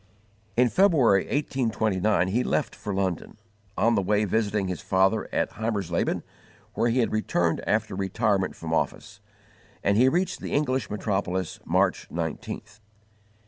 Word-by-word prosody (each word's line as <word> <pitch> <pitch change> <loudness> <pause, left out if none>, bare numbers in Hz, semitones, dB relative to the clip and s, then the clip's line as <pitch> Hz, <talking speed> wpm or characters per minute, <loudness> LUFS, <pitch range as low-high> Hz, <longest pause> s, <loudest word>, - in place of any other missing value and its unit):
In 125 0 +5
February, 135 - +4
1829, 110 - 0
he 120 +6 +1
left 130 -2 -1
for 105 - -5
London, 95 0 -2 0.4
on 115 +1 +3
the 100 - +2
way 105 +2 +1
visiting 105 -1 0
his 90 -3 -4
father 95 +3 +1
at - - 0
Heimersleben, 100 -6 -1 0.5
where 120 - +1
he 125 +2 +2
had 115 - 0
returned 90 -6 0
after 110 0 +1
retirement 100 0 0
from 80 -1 -5
office; - - -2 0.6
and 100 +1 +2
he 130 +3 +6
reached 180 +5 0
the - - -5
English 130 -3 0
metropolis 95 -4 -2
March - - +1
19th. 85 +4 -5
105 Hz, 140 wpm, -26 LUFS, 95-115 Hz, 0.6 s, he